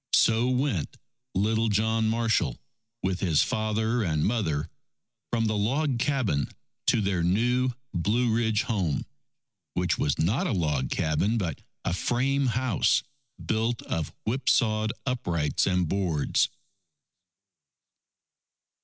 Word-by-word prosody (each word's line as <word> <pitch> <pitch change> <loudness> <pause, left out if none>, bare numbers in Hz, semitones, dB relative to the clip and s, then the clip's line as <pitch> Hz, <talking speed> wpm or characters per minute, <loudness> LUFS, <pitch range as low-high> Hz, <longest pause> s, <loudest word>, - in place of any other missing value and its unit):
So 115 +2 +4
went 125 - -1 0.4
little 110 +3 +2
John 110 +2 +1
Marshall 110 - +1 0.5
with 95 -1 0
his 85 -6 +3
father 110 +2 0
and 80 -7 0
mother, 85 -9 0 0.6
from 115 -1 +1
the 110 0 0
log 130 +5 0
cabin 120 - 0 0.4
to 115 - +4
their 95 -3 0
new 120 +9 +2 0.2
Blue 110 +7 +1
Ridge 110 -2 +1
home, 95 - -1 0.7
which 90 -2 0
was 70 - +1
not 100 - +1
a - - 0
log 75 -8 0
cabin, 90 +9 +1
but 85 -9 -3 0.2
a - - 0
frame 135 +7 +1
house 120 -3 +2 0.4
built 115 +1 0
of 80 -3 -3
whipsawed 110 -3 +2
uprights 85 - 0
and 90 -2 +1
boards. 85 -5 +1
110 Hz, 115 wpm, -27 LUFS, 90-120 Hz, 0.7 s, So